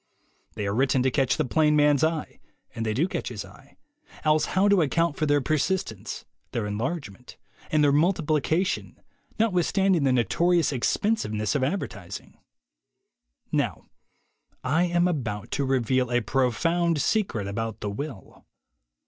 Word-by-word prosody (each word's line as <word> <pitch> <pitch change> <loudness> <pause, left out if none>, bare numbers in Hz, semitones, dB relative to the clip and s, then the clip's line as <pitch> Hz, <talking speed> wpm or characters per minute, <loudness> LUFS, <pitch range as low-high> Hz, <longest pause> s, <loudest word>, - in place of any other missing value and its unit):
They 105 - -3
are 100 - -1
written 130 +2 +2
to 130 - +2
catch 135 -1 +1
the 155 - +1
plain 150 +3 +3
man's 145 -1 +4
eye, 160 -1 -1 0.3
and 115 - -4
they 110 -1 -1
do 155 +9 +2
catch - - -4
his - - -6
eye, - - -18 0.5
else 155 0 +3
how 190 +2 +1
account 170 -5 +2
for 155 - -1
their 145 0 +3
persistence, 135 - -2 0.3
their 115 -3 -1
enlargement, 120 - -5 0.3
and 155 -1 +3
their 145 - +5
multiplication, 160 +2 +1 0.4
notwith 185 -7 +2
standing 190 -5 +2
the 135 - +3
notorious 165 - +2
expensiveness 120 - 0
of 140 - 0
adver 180 +9 0
tising? 100 -2 -10 1.1
Now - - -1 0.7
I 155 +7 +2
am 175 0 +2
about 115 - -3
to 140 - 0
reveal 130 -1 +1
a 120 0 +2
profound 165 +8 +1
secret 165 - 0
about 115 +2 -4
the 105 - -3
will. 130 -1 -8
145 Hz, 145 wpm, -26 LUFS, 120-170 Hz, 1.1 s, their